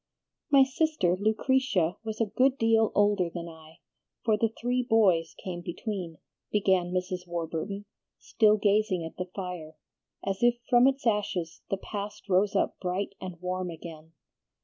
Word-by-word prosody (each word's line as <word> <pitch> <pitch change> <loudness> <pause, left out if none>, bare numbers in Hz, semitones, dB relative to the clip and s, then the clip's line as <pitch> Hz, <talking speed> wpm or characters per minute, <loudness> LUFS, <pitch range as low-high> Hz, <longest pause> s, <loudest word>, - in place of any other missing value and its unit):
"My 275 -2 +7
sister 265 - +1
Lucretia 215 -3 +1
was 220 -1 -5
a 225 - +3
good 255 +6 +2
deal 225 -2 +3
older 205 -4 +3
than 170 0 -6
I, 160 -1 -14 0.4
for 220 -2 +4
the 225 +2 +1
three 250 +1 +1
boys 205 -9 +3
came 175 -2 -6
between," 175 -2 -5 0.3
began 190 -4 +2
Mrs. 180 0 -3
Warburton, 170 +4 -4 0.3
still 215 -2 +3
gazing 205 -4 +2
at 160 - -9
the 180 - -2
fire, 180 -5 -6 0.5
as 195 0 -2
if 240 0 +4
from 245 0 +6
its 270 0 0
ashes 200 -7 -1
the 195 - 0
past 205 +2 -6
rose 195 +2 +3
up - - 0
bright 185 +2 -2
and 185 -2 -7
warm 185 0 -2
again. 160 -1 -10
195 Hz, 150 wpm, -28 LUFS, 175-220 Hz, 0.5 s, My